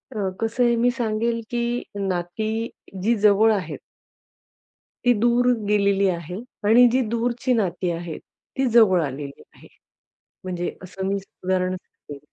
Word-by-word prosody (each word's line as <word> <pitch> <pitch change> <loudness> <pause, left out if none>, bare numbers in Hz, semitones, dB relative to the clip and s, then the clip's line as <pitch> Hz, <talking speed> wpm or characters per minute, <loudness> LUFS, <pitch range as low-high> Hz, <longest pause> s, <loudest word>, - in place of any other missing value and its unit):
अ, 195 -3 -1
कसं 230 +2 +1
आहे, 235 0 +3
मी 245 +1 +3
सांगेल, 230 0 -1
की 240 0 -1 0.2
नाती 180 +4 -2 0.5
जी 235 +2 +3
जवळ 210 +2 +6
आहेत. 170 -7 -4 1.3
ती 245 - +6
दूर 240 +1 +3 0.2
गेलेली 200 -1 +3
आहे 170 0 -4 0.3
आणि 245 +3 +7
जी 260 +1 +2
दूरची 240 +2 0
नाती 185 -5 0
आहेत, 170 -1 -5 0.4
ती 265 - +2
जवळ 195 -7 +6
आलेली 140 +1 -7
आहे. - - -16 0.8
म्हणजे 175 -1 -4
असं 190 +1 -6
मी 195 - 0 0.3
उदाहरण 185 0 0
सांगेल. 145 -5 -13
210 Hz, 135 wpm, -23 LUFS, 180-235 Hz, 1.3 s, आणि